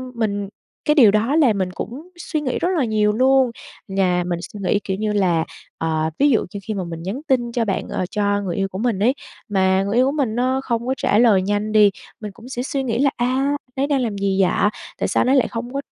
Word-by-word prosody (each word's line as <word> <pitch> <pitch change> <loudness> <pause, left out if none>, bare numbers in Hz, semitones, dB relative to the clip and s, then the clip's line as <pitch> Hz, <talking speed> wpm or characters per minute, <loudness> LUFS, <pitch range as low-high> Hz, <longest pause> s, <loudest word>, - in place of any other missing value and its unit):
mình 205 -3 -2 0.4
cái 300 - +3
điều 235 -9 +7
đó 225 +7 +1
làm 260 -10 +4
mình 185 -2 -1
cũng 275 - -7
suy 315 -3 -3
nghĩ 260 -4 -2
rất 345 - 0
là 275 - +2
nhiều 215 -2 +2
luôn. 260 +1 +3 0.4
Nhà 185 -2 +1
mình 175 -1 -2
suy 205 +3 -9
nghĩ, 200 +2 +2
kiểu 190 -1 -3
như 215 +1 -1
là, 175 -5 +2 0.3
ờ, 160 -1 -1
ví 290 - +5
dụ 235 - +2
như 200 - -4
khi 220 - -4
mà 195 -3 -3
mình 165 -1 -7
nhắn 205 +9 -4
tin 240 -3 +1
cho 235 -1 0
bạn 195 - -2
ờ, 185 - -2
cho 205 -1 0
người 180 -4 -3
yêu 195 -1 0
của 190 - -8
mình 225 -2 0
ấy, 235 +6 +3 0.4
mà 190 -1 +2
người 200 +2 -2
yêu 250 +2 +4
của 270 - +1
mình 275 -7 -1
nó 255 +2 +1
không 235 -1 -2
có 260 - +1
trả 205 - +1
lời 220 -5 +5
nhanh 205 +2 -1
đi, 210 -1 +6 0.3
mình 210 -2 -6
cũng 230 +5 -14
sẽ 245 -2 -3
suy 270 0 -2
nghĩ 235 -2 -1
là 280 +1 +4
"A, 240 - +1
anh 270 +3 +1 0.2
ấy 275 +1 0
đang 280 -3 +1
làm 220 -5 -2
gì 195 -1 +1
vậy? 190 +2 +2 0.3
Tại - - -1
sao - - +1
anh - - +1
ấy 270 - +4
lại 265 - +3
không 240 +2 -6
có 275 - -2
215 Hz, 265 wpm, -21 LUFS, 195-255 Hz, 0.4 s, điều